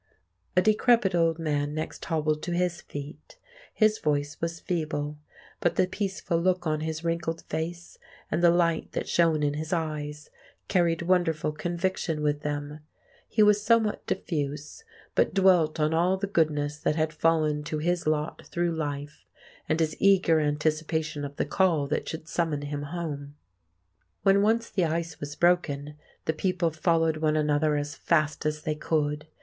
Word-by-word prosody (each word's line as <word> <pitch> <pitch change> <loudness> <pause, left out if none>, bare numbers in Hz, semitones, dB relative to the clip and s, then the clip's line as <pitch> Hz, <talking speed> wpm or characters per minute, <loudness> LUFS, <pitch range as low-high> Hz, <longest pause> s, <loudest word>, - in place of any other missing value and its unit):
A 180 - +6
decrepit 215 -2 +3
old 165 -2 +2
man 145 -2 -1
next 155 - -5
hobbled 155 -2 0
to 175 - -3
his 175 -1 0
feet. 145 +1 -9 0.3
His 215 -1 +2
voice 145 -1 0
was 165 0 -2
feeble; 150 -4 -3 0.4
but 175 - +1
the - - +3
peaceful 190 -3 -2
look 185 0 +1
on 155 -1 0
his 160 +1 -4
wrinkled 165 0 -2
face, 170 +2 -5 0.3
and 160 - +1
the 175 - +6
light 170 -1 +1
that - - -3
shone 165 -3 +2
in 145 -1 +1
his 155 +2 -5
eyes, 150 -3 -3 0.4
carried 170 -3 +2
wonderful 170 -4 +1
conviction 170 -1 -2
with 145 0 0
them. 145 0 -4 0.5
He 215 - +4
was 210 0 +5
somewhat 220 -1 +2
diffuse, 150 - -3 0.3
but - - +2
dwelt 180 -5 +4
on 155 +1 +2
all 175 +3 +2
the 195 - -2
goodness 150 -5 0
that 150 - 0
had 155 0 0
fallen 155 -2 +1
to 155 - -3
his 170 +1 -1
lot 155 0 -1
through 175 0 0
life, 145 -1 -5 0.4
and 155 - +1
his 155 -1 +1
eager 185 -5 +4
anticipation 155 0 -1
of 140 0 -6
the - - -1
call 165 -1 +2
that - - -1
should 160 0 -6
summon 160 -4 -1
him 145 0 -4
Home. 145 -4 -5 0.9
When 195 0 +5
once 230 +2 +2
the 180 - 0
ice 165 -1 -2
was 145 0 -6
broken, 150 -5 +1 0.3
the 160 - +1
people 175 0 0
followed 165 0 +1
one 155 0 +1
another 150 0 +2
as 145 0 -3
fast 155 -2 0
as 150 0 -3
they 155 - 0
could. 150 0 -1
160 Hz, 165 wpm, -27 LUFS, 150-175 Hz, 0.9 s, A